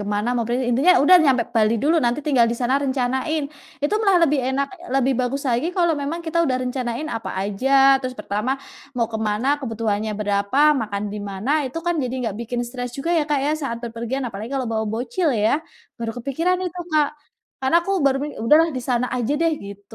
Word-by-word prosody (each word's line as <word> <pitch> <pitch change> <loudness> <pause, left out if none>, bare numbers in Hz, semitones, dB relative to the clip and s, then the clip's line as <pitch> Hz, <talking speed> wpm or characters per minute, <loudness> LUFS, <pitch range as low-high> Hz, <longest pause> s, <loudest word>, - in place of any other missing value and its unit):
mana, 210 +3 -1
mau 240 -2 0
pergi 250 +2 0
intinya 280 +10 +5
udah 365 +4 +8
nyampe 260 -4 +3
Bali 220 0 +3
dulu, 315 +4 +3
nanti 240 +4 +1
tinggal 260 -6 +4
di - - -4
sana 250 +2 0
rencanain, 265 +3 -1 0.4
itu 320 +8 +1
malah 395 -4 +4
lebih 300 -2 +1
enak 275 +1 0 0.3
lebih 270 0 +3
bagus 270 +3 -2
lagi 245 +3 +1
kalau 345 -2 +3
memang 295 +3 -3
kita 330 +1 0
udah 260 -5 +1
rencanain 250 +1 -3
apa 225 - -6
aja, 205 +6 -2 0.3
terus 255 -1 -5
pertama 210 +5 -2 0.4
mau 235 - +2
ke 220 - -2
mana, 265 +8 0
kebutuhannya 220 -3 -2
berapa, 205 +3 -1 0.2
makan 205 -2 -3
di 210 - -5
mana, 195 +7 -4 0.2
itu 275 - -5
kan 345 - +2
jadi 255 -1 -3
nggak 220 -4 -2
bikin 240 +1 -3
stres 245 +1 -5
juga 275 +5 -2
ya - - +2
Kak, 295 - +2
ya, 295 - +1
saat 235 -4 -2
berpergian 235 +3 -4
apalagi 220 -2 -5
kalau 265 - -1
bawa 220 0 0
bocil 240 - -1 0.2
ya, 280 +8 +2 0.4
baru 225 0 -4
kepikiran 300 +9 0
itu 360 0 -5
Kak, 305 -2 +3 0.5
karena 265 +5 +3
aku 390 - -1
baru 275 -1 +3 0.2
udah 230 +7 +5
lah 330 - +1
di - - -2
sana 250 0 +1
aja 250 +1 -1
deh, 330 -1 +3
gitu. 200 0 -11
255 Hz, 205 wpm, -22 LUFS, 230-290 Hz, 0.5 s, udah